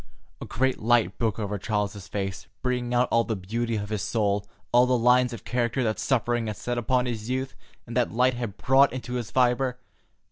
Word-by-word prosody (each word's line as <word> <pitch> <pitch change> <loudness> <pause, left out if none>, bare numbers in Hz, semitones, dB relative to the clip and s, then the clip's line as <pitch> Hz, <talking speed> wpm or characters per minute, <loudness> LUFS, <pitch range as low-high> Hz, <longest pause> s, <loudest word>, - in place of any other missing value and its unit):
A - - -4
great 130 +2 0
light 120 +1 +2
broke 115 -3 0
over 105 -2 -3
Charles's 105 -2 -2
face, 95 0 -4 0.2
bringing 125 -1 -1
out 125 0 +3
all 115 - +4
the 110 -1 -2
beauty 115 +5 -2
of 105 -1 -3
his 105 -2 -2
soul, 105 -2 0 0.2
all 125 +1 +5
the 125 0 +3
lines 125 +1 +4
of 115 - -8
character 120 +1 0
that 110 -2 -1
suffering 120 -3 0
had 105 - -4
set 120 0 -2
upon 125 +1 +1
his 115 -2 -4
youth, 130 +1 -2 0.3
and 115 - -8
that 125 -2 +1
love 125 +3 +3
had 120 -4 -4
wrought 135 +2 +6
into 125 -1 -5
his 120 -3 -3
fibre. 125 0 +2
120 Hz, 205 wpm, -26 LUFS, 110-125 Hz, 0.3 s, wrought